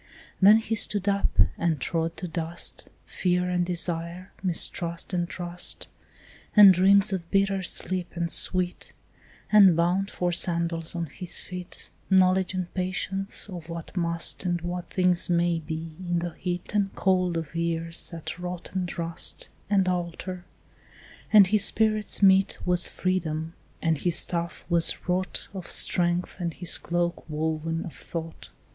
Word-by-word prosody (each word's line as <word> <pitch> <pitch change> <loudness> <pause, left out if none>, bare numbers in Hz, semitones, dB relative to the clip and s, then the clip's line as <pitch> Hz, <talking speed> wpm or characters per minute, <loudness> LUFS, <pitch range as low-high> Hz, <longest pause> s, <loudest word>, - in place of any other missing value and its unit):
Then 205 +3 +8
he 225 0 -3
stood 205 -2 -1
up, 200 0 0 0.2
and 165 -3 0
trod 165 +4 -2
to 180 - -5
dust 165 0 -5 0.2
Fear 180 0 0
and 180 0 +1
desire, 175 +1 -1
mistrust 170 -1 -3
and 175 -1 -1
trust, 175 0 -4 0.7
And 205 -3 +10
dreams 195 +2 +4
of 170 -3 -4
bitter 195 -1 +1
sleep 180 0 -3
and 170 -1 -2
sweet, 180 -1 -2 0.6
And 195 -5 +7
bound 180 +4 +1
for 180 -3 -1
sandals 170 -1 -1
on 170 -1 -2
his 175 +4 -5
feet 180 -1 -9 0.2
Knowledge 190 0 +3
and 180 -1 -4
patience 190 +2 -2
of 175 -4 -9
what 165 +1 -8
must 170 -1 -1
And 175 -2 0
what 175 +1 -5
things 180 -2 +2
may 170 -1 +2
be, 160 0 -6
in 175 -2 -2
the 170 0 -2
heat 180 +3 -5
And 200 -2 +1
cold 185 -3 +1
of 160 -2 -5
years 165 0 -2
that 165 +1 -7
rot 180 -1 -6
and 185 -2 -3
rust 170 -1 -1 0.2
And 195 -2 +2
alter; 180 0 -3 0.9
and 210 -2 +8
his 205 +2 +2
spirit's 215 -2 +2
meat 190 0 +5
Was 180 -1 +3
freedom, 165 -3 -2 0.3
and 160 -3 +1
his 175 -2 +1
staff 170 -1 0
was 170 -2 +4
wrought 185 +1 0
Of 185 -3 -7
strength, 175 0 +3
and 170 -2 -3
his 175 -2 +2
cloak 175 0 -2
woven 160 +1 -2
of 165 - -8
thought. 165 -1 -7
175 Hz, 150 wpm, -26 LUFS, 170-185 Hz, 0.9 s, And